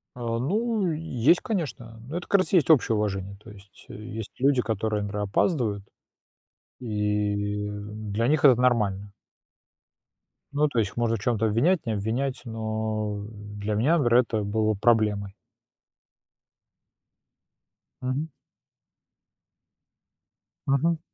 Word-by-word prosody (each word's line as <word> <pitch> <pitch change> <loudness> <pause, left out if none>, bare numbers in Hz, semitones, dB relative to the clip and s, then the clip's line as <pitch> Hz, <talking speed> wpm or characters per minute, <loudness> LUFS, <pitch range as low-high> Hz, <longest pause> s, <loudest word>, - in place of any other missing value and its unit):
А, 115 -2 -2
ну 205 - 0
есть, 155 -1 +2
конечно, 145 - -4
но 160 - -4
это, 175 - -6
как 200 - +4
раз, 185 - -1
и 185 - +7
есть 155 - +2
общее 130 -7 +5
уважение. 100 -2 -2
То - - -12
есть 100 -1 -16
есть 110 0 -7
люди, 135 -1 +3
которые, 110 -1 -1
например, 105 0 -3
опаздывают, 105 - 0 1.0
и 105 -2 -1
для 105 +2 -3
них 150 +2 +2
это 130 -4 +7
нормально. 105 -5 +1 1.4
Ну, 150 +1 +3
то 130 -5 -1
есть 105 -3 +1
их - - -20
можно 115 -1 +1
в - - -5
чём-то 115 0 0
обвинять, 135 - +2
не 115 - -1
обвинять, 115 +6 -2
но 110 -2 -3 0.3
для 105 +1 -3
меня, 140 +11 +3
например, 120 -5 +4
это 110 -3 -2
было 110 +1 +1
проблемой. 105 -2 +1 2.7
Мгм. 130 +5 -2 2.4
Мгм. 155 +5 +2
115 Hz, 120 wpm, -26 LUFS, 105-135 Hz, 2.7 s, и